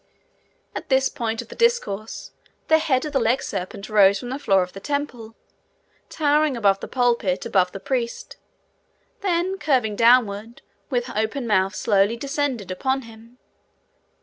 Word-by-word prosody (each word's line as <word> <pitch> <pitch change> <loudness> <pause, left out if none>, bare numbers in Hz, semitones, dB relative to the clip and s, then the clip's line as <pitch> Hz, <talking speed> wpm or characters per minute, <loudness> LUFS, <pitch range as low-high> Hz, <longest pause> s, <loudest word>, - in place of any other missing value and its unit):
At - - -6
this 265 0 +3
point 230 -5 -3
of - - -21
the - - -10
discourse 465 - -1 0.4
the 315 0 +6
head 270 -4 +1
of 300 - -5
the 270 - +3
legserpent 210 -5 -2
rose 200 -2 +5
from 245 +5 -7
the 265 +2 -4
floor 195 -8 +3
of 180 - -9
the 195 - -8
temple, 245 -3 -4 0.7
towering 300 -2 +1
above 200 -3 +3
the - - -7
pulpit, 235 -7 0
above 185 -2 +2
the 195 - -7
priest, 240 +1 -3 0.8
then 375 0 -1
curving 255 -8 +1
downward, 230 -1 +2 0.3
with 245 -3 -2
open 220 +5 -1
mouth 195 -3 +1
slowly 205 +1 +2
descended 275 - -2
upon 265 +8 -1
him. 230 +1 -15
235 Hz, 150 wpm, -23 LUFS, 205-275 Hz, 0.8 s, the